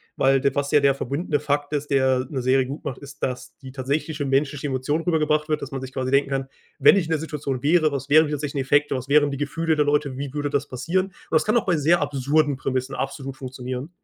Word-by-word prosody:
weil 135 0 +3
der 140 - +1
was 140 0 -1
ja 150 - +6
der 140 -1 +4
verbundene 145 +3 -2
Fakt 145 0 -1
ist, 145 0 -1
der 130 -2 +2
'ne 135 -4 -3
Serie 130 0 +3
gut 140 +3 -7
macht, 130 - -5
ist, 140 0 -12
dass 125 -1 -4
die 130 -2 -11
tatsächliche 145 +3 -2
menschliche 140 +1 0
Emotion 135 +4 -1
rübergebracht 155 -2 +1
wird. 150 -1 0
Dass 140 - -7
man 135 -1 -4
sich 130 0 -7
quasi 130 0 -2
denken 140 0 +3
kann: 135 -1 -2 0.3
„Wenn 140 +6 +7
ich 175 - +1
in 160 - -6
der 160 - +1
Situation 140 -5 -4
wäre, 155 0 +3
was 135 0 -4
wären 155 +2 +6
die - - -5
tatsächlichen 145 -2 -2
Effekte? 145 0 +2
Was 130 +1 -5
wären 145 -1 +4
die 140 - -4
Gefühle 160 +3 -1
der 150 -1 +2
Leute? 145 -2 0
Wie 140 0 -5
würde 145 -1 -2
das 140 - 0
passieren?” 170 +9 -1
Und 190 - -19 0.2
das 160 - +3
kann 215 +3 +3
auch 225 - 0
bei 175 -4 +2
sehr 165 +4 +3
absurden 145 0 +1
Prämissen 130 0 -2
absolut 135 0 -5
funktionieren. 130 +1 -6
140 Hz, 250 wpm, -23 LUFS, 135-150 Hz, 0.3 s, Wenn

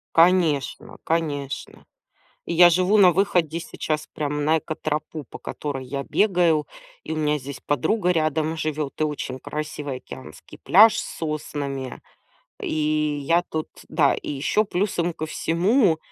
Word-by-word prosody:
Конечно, 170 +3 +2
конечно. 145 -4 -3 0.6
И - - -3
я 175 +1 +8
живу 185 +4 +3
на 185 -3 +7
выходе 175 -3 +1
сейчас 155 -2 -4
прямо 150 0 -2
на 155 +2 +3
экотропу, 155 -1 -4
по - - -8
которой 135 -3 -5
я 140 +2 -4
бегаю, 175 -7 +2 0.4
и - - -6
у - - -1
меня 150 -1 +1
здесь 140 -1 -8
подруга 180 - +1
рядом 155 -1 0
живет, 155 -2 -3
и - - +4
очень 145 -4 -3
красивый 150 -3 -5
океанский 65 - -12
пляж 215 +4 +6
с - - -5
соснами. 145 -4 -4 0.6
И 150 -1 0
я 170 +3 +3
тут 160 -3 -4 0.2
да, - - +3
и - - -6
еще 145 +9 +1
плюсом 180 -3 -1
ко 160 -1 -5
всему, 175 - +2
155 Hz, 140 wpm, -23 LUFS, 145-175 Hz, 0.6 s, я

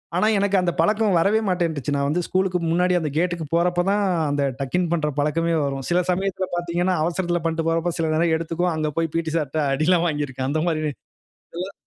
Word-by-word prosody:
ஆனா, 210 +4 +3
எனக்கு 200 0 +1
அந்த 180 -1 +1
பழக்கம் 210 +2 +2
வரவே 200 +6 +3
மாட்டேன்ருச்சு. 160 -6 -1
நான் 140 0 0
வந்து 170 +5 0
ஸ்கூலுக்கு 185 -1 0
முன்னாடி 180 +2 +2
அந்த 155 -2 -2
கேட்க்கு 175 -2 0
போறப்போ 175 +1 +2
தான், 205 0 +2 0.3
அந்த 145 0 0 0.2
டக்-இன் 170 +7 0
பண்ற 150 -3 0
பழக்கமே 165 +3 +1
வரும். 135 -1 -3
சில 175 +1 +3
சமயத்தில 190 0 -1
பாத்தீங்கன்னா, 175 +1 0
அவசரத்தில 175 0 -1
பண்ணிட்டு 165 0 -1
போறப்போ, 165 +1 0
சில 160 -1 0
நேரம் 165 +1 +2
எடுத்துக்கும். 170 +2 -1
அங்கே 155 -1 -1
போய் 165 -2 0
பிடி 165 -1 -1
சார்ட்ட 155 0 -2
அடியெல்லாம் 170 +4 +2
வாங்கியிருக்கேன். 135 -4 -2
அந்த 155 +2 0
மாரி 155 -2 0 0.7
இதெல்லாம் 180 +3 -5
170 Hz, 185 wpm, -23 LUFS, 155-180 Hz, 0.7 s, ஆனா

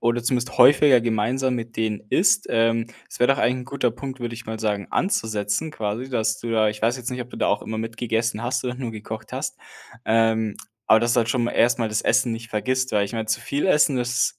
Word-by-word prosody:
oder 120 0 +1
zumindest 125 +1 -1
häufiger 135 -1 +6
gemeinsam 120 +3 0
mit 115 -1 -6
denen 110 -2 -1
isst. 200 - +3
Ähm, 115 0 +1 0.2
das - - -11
wär 125 - +5
doch 135 +1 +3
ein 125 -1 0
guter 130 -2 0
Punkt, 130 +3 -7
würde 120 -1 -4
ich 120 +1 -10
mal 110 0 -5
sagen, 105 -2 -2
anzusetzen, 110 - -1
quasi, 110 -1 -4
dass 110 -4 0
du 120 - -5
da 110 -1 +3
ich 105 0 -9
weiß 115 +3 +1
jetzt 125 0 -5
nicht, 125 - -4
ob 125 - -6
du - - -11
da - - 0
auch 100 - +1
immer 110 - -5
mitgegessen 115 0 -2
hast 125 +1 -1
oder 125 0 -2
nur 125 -3 -5
gekocht 110 0 -8
hast. - - -4 0.5
Ähm, 110 -1 +2 0.3
aber 110 - +6
dass 120 0 +1
du 120 - +2
halt 115 - +1
schon 120 0 +1
mal 120 - -1
erst 120 0 +3
mal 115 -2 0
das 110 - 0
Essen 120 - +2
nicht 115 0 -7
vergisst, 130 +4 -1
weil 105 -1 +2
ich 100 - -7
meine, 110 -1 -3
zu 110 +2 -1
viel 140 +8 -1
Essen 150 -6 +4
das 125 0 0
115 Hz, 240 wpm, -23 LUFS, 110-125 Hz, 0.5 s, häufiger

